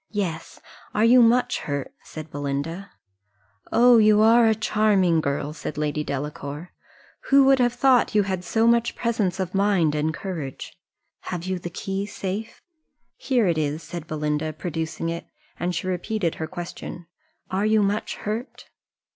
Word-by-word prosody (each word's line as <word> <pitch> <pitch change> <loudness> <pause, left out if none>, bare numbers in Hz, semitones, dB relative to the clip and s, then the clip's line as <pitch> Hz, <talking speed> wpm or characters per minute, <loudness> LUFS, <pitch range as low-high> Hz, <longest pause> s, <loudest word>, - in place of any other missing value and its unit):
"Yes 180 -6 -4 0.4
are 215 - +3
you 245 +2 +7
much 240 +2 +3
hurt?" 145 -2 -4
said 155 -1 -10
Belinda. 145 +7 -4 0.8
"Oh, 240 0 +6
you 215 -1 +5
are 230 +1 +6
a 220 - +3
charming 205 -6 +2
girl!" 145 +1 -2
said 150 -1 -6
Lady 150 0 -1
Delacour. 145 +3 -5 0.5
"Who 275 0 +6
would 270 0 +5
have 245 -1 +3
thought 250 -2 +3
you 210 - +5
had 190 -2 -3
so 225 +5 +1
much 235 0 +3
presence 215 -6 -1
of 185 -1 -3
mind 195 -6 +2
and 150 +1 0
courage 155 -6 -6 0.5
have 175 -2 -4
you 185 -1 -2
the 175 - -6
key 195 +3 -4
safe?" 200 +3 -5 0.5
"Here 250 -5 +1
it 170 -3 +1
is," 150 +1 -2
said 170 -2 -7
Belinda, 150 0 -2
producing 165 0 -4
it; 170 0 -5 0.3
and 175 0 -1
she 175 - -3
repeated 185 0 -1
her 160 - -2
question, 175 0 -7 0.5
"Are 195 +3 +1
you 215 -1 +3
much 205 +2 -1
hurt?" 220 +5 -6
185 Hz, 155 wpm, -24 LUFS, 155-215 Hz, 0.8 s, you